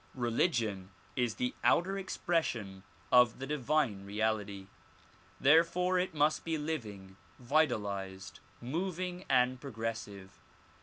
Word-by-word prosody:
Religion 115 - 0 0.3
is 120 -4 0
the 125 - -1
outer 190 +3 +3
expression 155 - -2 0.3
of 125 -2 +6
the 135 - -5
divine 135 -7 0
reality. 105 -1 -2 0.7
Therefore 170 +5 +4
it 180 -2 -2
must 150 +1 +2
be 165 -1 -1
living, 105 -12 -5 0.2
vitalized, 100 -9 -1 0.2
moving 180 +6 -3
and 125 -1 +3
progressive. 110 -6 -6
125 Hz, 100 wpm, -32 LUFS, 105-160 Hz, 0.7 s, of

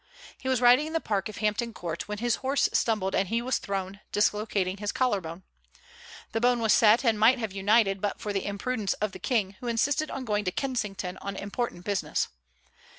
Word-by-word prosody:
He 260 - -4
was 255 -2 +1
riding 250 +5 +6
in 320 - -7
the 325 - +2
park 205 -7 -2
of 215 - -9
Hampton 215 +2 -1
Court, 170 -2 -5
when 210 0 -4
his 235 +1 0
horse 270 +2 +1
stumbled 210 -4 +1
and 190 - +1
he 230 +4 0
was 255 +2 -1
thrown, 195 0 -4
dislocating 205 -2 0
his 205 0 -2
collar 250 -7 +1
bone. 165 +2 -8 0.9
The 225 - -1
bone 245 0 +3
was 225 -2 +3
set, 225 +2 +5
and 225 -2 +3
might 235 +5 +6
have 220 -5 -4
united 195 0 +3
but 205 - -2
for 210 - -3
the 195 0 -2
imprudence 205 +1 -1
of 210 -1 -2
the - - -10
King, 200 -6 -1
who 245 - -6
insisted 280 +6 +1
on 265 -1 -5
going 210 -2 0
to 185 - 0
Kensington 205 -7 -3
on 200 0 -5
important 200 -2 -4
business. 200 -2 -1
210 Hz, 210 wpm, -27 LUFS, 195-240 Hz, 0.9 s, riding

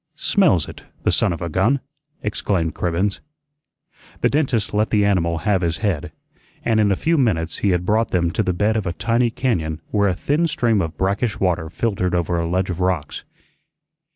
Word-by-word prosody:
"Smells 160 - +2
it, - - -10 0.2
the - - +3
son - - +2
of 85 +1 -4
a - - -2
gun!" 105 - +2 0.4
exclaimed 95 -5 -1
Cribbens. 90 +4 -1 1.0
The - - +3
dentist 130 -9 0
let 105 +1 +1
the 105 -2 +3
animal 85 -4 +1
have 95 +3 +1
his 85 -2 0
head, 90 -4 -2 0.5
and 110 -2 +2
in 105 -2 +3
a - - +3
few 165 - +1
minutes 85 -10 0
he 100 - +1
had 90 -1 +1
brought 110 +2 +2
them 85 -2 +1
to 100 - 0
the 95 - 0
bed 105 +5 +1
of 110 -4 -1
a 85 - -1
tiny 115 +4 +1
cañón 90 - -1
where 100 -1 +2
a 95 - +1
thin 150 - +1
stream 120 - +1
of 80 -2 -4
brackish 100 +4 0
water 90 -4 0
filtered 90 0 -1
over 85 0 0
a 85 0 -2
ledge 95 +2 0
of 90 - -5
rocks. 90 -5 -2
95 Hz, 195 wpm, -21 LUFS, 85-110 Hz, 1.0 s, the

